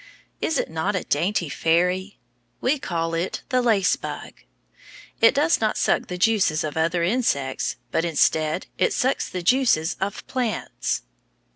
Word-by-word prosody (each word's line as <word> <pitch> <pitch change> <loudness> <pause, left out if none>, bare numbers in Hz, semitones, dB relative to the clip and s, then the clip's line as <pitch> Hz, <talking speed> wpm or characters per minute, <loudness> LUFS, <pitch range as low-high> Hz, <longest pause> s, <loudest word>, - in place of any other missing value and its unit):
Is 320 - 0
it - - 0
not 165 +6 -1
a 185 - -1
dainty 175 +3 0
fairy! 180 +6 0 0.4
We 275 +3 +1
call 165 -6 -2
it 170 +3 -2
the 255 -1 +2
lace 215 -6 +3
bug. - - -7 0.9
It 230 +5 +6
does 300 +1 +3
not 220 - +1
suck - - +1
the 180 - -5
juices 185 -6 +2
of 155 -1 -4
other 165 +2 +1
insects, 170 - 0 0.2
but 165 - +1
instead 155 0 +1
it - - +2
sucks 260 +2 0
the 180 -1 -5
juices 210 -8 +3
of 195 +1 -3
plants. 245 - -2
185 Hz, 150 wpm, -23 LUFS, 165-225 Hz, 0.9 s, It